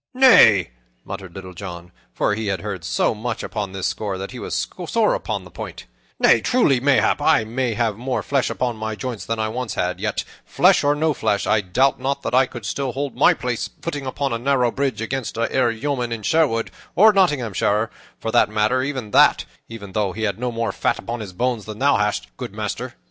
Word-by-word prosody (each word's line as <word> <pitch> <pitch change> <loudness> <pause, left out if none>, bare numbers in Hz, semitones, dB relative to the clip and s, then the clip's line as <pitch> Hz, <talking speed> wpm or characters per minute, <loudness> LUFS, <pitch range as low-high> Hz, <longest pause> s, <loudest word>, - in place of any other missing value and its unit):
"Nay," 110 - +6 0.3
muttered 90 -3 -8
Little 95 -1 -8
John 90 -1 -8 0.2
(for - - 0
he 110 0 -3
had 95 -3 -1
heard 100 -4 -5
so - - +1
much 110 +1 -4
upon 100 -3 -4
this 95 -1 -4
score 100 -3 -2
that 95 +1 -6
he - - -8
was - - -2 0.2
sore - - +2
upon - - -3
the - - -14
point), - - -8 0.3
"nay, 115 - +5
truly, 150 - +3
mayhap 140 +2 +2
I 150 -6 +4 0.3
have 115 -3 0
more 125 +2 -2
flesh 140 -2 0
upon 120 -3 -2
my 110 0 -4
joints 120 -1 -5
than 115 - -1
I 110 0 0
once 125 0 -4
had, 90 0 -1
yet, - - -2 0.2
flesh - - +3
or 145 +1 +3
no 155 +1 +1
flesh, 110 -5 0
I 110 - +2
doubt 130 +10 +1
not 135 +2 -2
that - - -3
I 130 +1 +5
could 120 -4 -9
still 135 +3 -2
hold 140 +1 -3
my - - +5
place 125 -2 -3
and - - -29
footing 145 -5 -4
upon 135 0 -2
a 115 - -2
narrow 125 -1 +2
bridge 135 -5 -2
against 130 0 -4
e'er 120 +2 +1
a 115 - -3
yeoman 125 -1 -2
in 115 -2 -4
Sherwood, 130 -5 +1 0.2
or 215 +3 +7
Nottinghamshire, 115 - +1 0.3
for 115 - -3
the - - +4
matter 110 +4 +1
of 130 -6 -4
that, - - +5 0.2
even 105 -4 -9
though 100 -2 -1
he 110 - -5
had 100 -1 -1
no 125 0 -2
more 115 -1 -2
fat - - 0
about 120 0 -5
his 100 -3 -7
bones 120 +2 -1
than 110 -1 -7
thou 140 +4 +3
hast, 105 -8 0
good - - -7
master." - - -4
115 Hz, 215 wpm, -21 LUFS, 105-135 Hz, 0.3 s, or